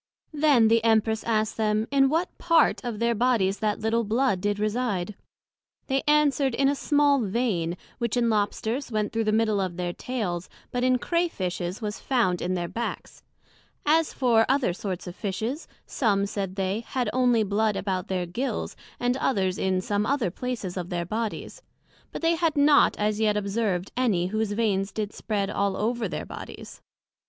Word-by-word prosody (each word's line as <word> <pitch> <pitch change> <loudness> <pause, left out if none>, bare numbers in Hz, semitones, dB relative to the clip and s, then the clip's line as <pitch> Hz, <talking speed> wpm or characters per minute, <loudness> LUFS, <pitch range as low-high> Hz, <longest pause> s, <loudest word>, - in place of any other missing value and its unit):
Then 290 -7 +4
the 225 0 +3
Empress 220 -1 +2
asked 220 -2 0
them, 215 0 +1
in 270 -1 +4
what 330 +5 -1
part 330 -5 +3
of 240 -3 -4
their 235 +2 +1
Bodies 220 -4 +1
that 215 -1 -1
little 225 +1 +1
blood 225 -2 +1
did 205 +1 0
reside? 210 -3 -1 0.7
They 270 0 0
answered, 290 -4 +3
in 275 +2 +3
a 280 - +3
small 285 -1 +3
vein, 195 -6 -1 0.2
which 235 0 -1
in 240 -1 +2
Lobsters 220 +4 -1
went 215 -1 -1
through 225 0 0
the 215 - +2
middle 215 -2 +2
of 180 -2 -3
their 175 -1 -2
tails, 185 -9 -4 0.2
but 245 0 -1
in 255 0 +4
Crea 340 +7 0
fishes 180 - -4
was 210 0 -3
found 225 -10 +1
in 185 +1 -1
their 175 -1 -2
backs: 235 +6 -5 0.6
as 320 +1 +3
for 235 -4 +3
other 265 -9 +2
sorts 185 -1 -5
of 180 -1 -7
Fishes, 225 - -3 0.2
some, 200 -6 +1
said 195 -2 -4
they, 195 +1 -1
had 245 +2 -3
onely 245 -3 +3
blood 210 +1 +1
about 190 -2 -2
their 185 -2 -1
Gills, 240 +11 -3 0.2
and 245 +1 +1
others 190 -9 0
in 190 -1 +1
some 205 +2 -1
other 265 -10 0
places 215 -5 -4
of 180 -1 -4
their 175 -1 -2
Bodies; 225 - -4 0.5
but - - -7
they 330 +1 +4
had 330 -2 0
not 285 0 +5
as 210 0 0
yet 210 -1 +2
observed 200 -2 -1
any 220 -9 +1
whose 215 -1 0
veins 205 -3 0
did 215 -1 -4
spread 205 -3 -2
all 200 -1 0
over 230 +2 -1
their - - -5
Bodies. - - -9
220 Hz, 180 wpm, -26 LUFS, 195-250 Hz, 0.7 s, not